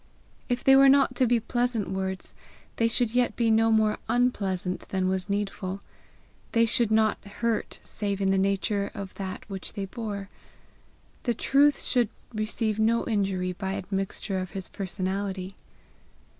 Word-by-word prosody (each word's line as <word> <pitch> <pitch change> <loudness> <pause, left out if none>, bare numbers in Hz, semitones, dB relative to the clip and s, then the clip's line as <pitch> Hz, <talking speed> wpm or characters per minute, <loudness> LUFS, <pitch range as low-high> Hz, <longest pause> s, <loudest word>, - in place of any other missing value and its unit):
If 245 0 -1
they 270 - +7
were 275 0 +8
not 275 -2 +5
to 255 - +4
be 240 0 +3
pleasant 240 -2 -1
words, 190 0 -3 0.4
they 230 - +3
should 230 0 +1
yet 245 -1 +2
be 230 -2 +2
no 225 +1 +4
more 215 -1 +3
unpleasant 195 -7 0
than 190 -1 0
was 190 +1 -1
needful; 200 -1 -2 0.7
they 230 0 +5
should 230 0 +2
not 220 0 +2
hurt 215 +2 -2
save 200 -2 -2
in 195 -1 +2
the 195 - +3
nature 200 +1 0
of 200 -2 -6
that 190 0 -5
which 195 -3 -6
they 200 - -3
bore; 205 -2 -5 0.9
the 240 -2 0
truth 280 +5 +3
should 240 -4 +2 0.2
receive 215 0 -1
no 230 +2 +2
injury 195 -4 0
by 190 +1 -3
admixture 195 0 -3
of 185 -1 -4
his 190 - -4
personality. 190 0 -3
205 Hz, 155 wpm, -27 LUFS, 190-230 Hz, 0.9 s, were